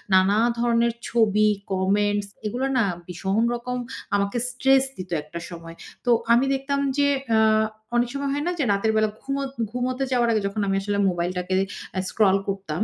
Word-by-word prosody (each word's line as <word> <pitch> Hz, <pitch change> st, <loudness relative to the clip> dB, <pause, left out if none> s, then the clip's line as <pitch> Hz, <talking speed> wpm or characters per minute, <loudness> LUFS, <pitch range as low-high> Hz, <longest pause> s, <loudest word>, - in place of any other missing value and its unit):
নানা 190 Hz, +3 st, +4 dB, 0.2 s
ধরনের 235 Hz, 0 st, +2 dB, 0.2 s
ছবি, 215 Hz, -2 st, +3 dB, 0.2 s
কমেন্টস 205 Hz, +2 st, +1 dB, 0.2 s
এগুলা 250 Hz, +5 st, -1 dB
না 240 Hz, -, +4 dB, 0.2 s
ভীষণ 190 Hz, +5 st, -1 dB
রকম 250 Hz, +1 st, -4 dB, 0.4 s
আমাকে 200 Hz, +3 st, 0 dB
স্ট্রেস 265 Hz, +1 st, +3 dB
দিত 185 Hz, 0 st, -7 dB
একটা 170 Hz, +3 st, -8 dB
সময়। 165 Hz, -1 st, -9 dB, 0.3 s
তো -, -, 0 dB, 0.2 s
আমি 240 Hz, +3 st, +4 dB
দেখতাম 275 Hz, +1 st, -1 dB, 0.2 s
যে 285 Hz, 0 st, +4 dB, 0.3 s
আ -, -, +4 dB, 0.6 s
অনেক 240 Hz, 0 st, +2 dB
সময় 280 Hz, 0 st, -2 dB
হয় 290 Hz, +1 st, -1 dB
না -, -, +1 dB
যে 290 Hz, -, +2 dB
রাতের 200 Hz, +2 st, +1 dB
বেলা 215 Hz, 0 st, +3 dB
ঘুমত 275 Hz, 0 st, -2 dB, 0.2 s
ঘুমুতে 255 Hz, +2 st, -2 dB
যাওয়ার 240 Hz, -2 st, +2 dB
আগে 215 Hz, -, +2 dB
যখন 205 Hz, +2 st, -3 dB
আমি 195 Hz, -, +1 dB
আসলে 205 Hz, 0 st, -2 dB
মোবাইলটাকে 180 Hz, +1 st, -2 dB, 0.4 s
আ -, -, +2 dB
স্ক্রল 195 Hz, -3 st, +3 dB
করতাম। 195 Hz, -2 st, -2 dB
215 Hz, 170 wpm, -24 LUFS, 195-250 Hz, 0.6 s, নানা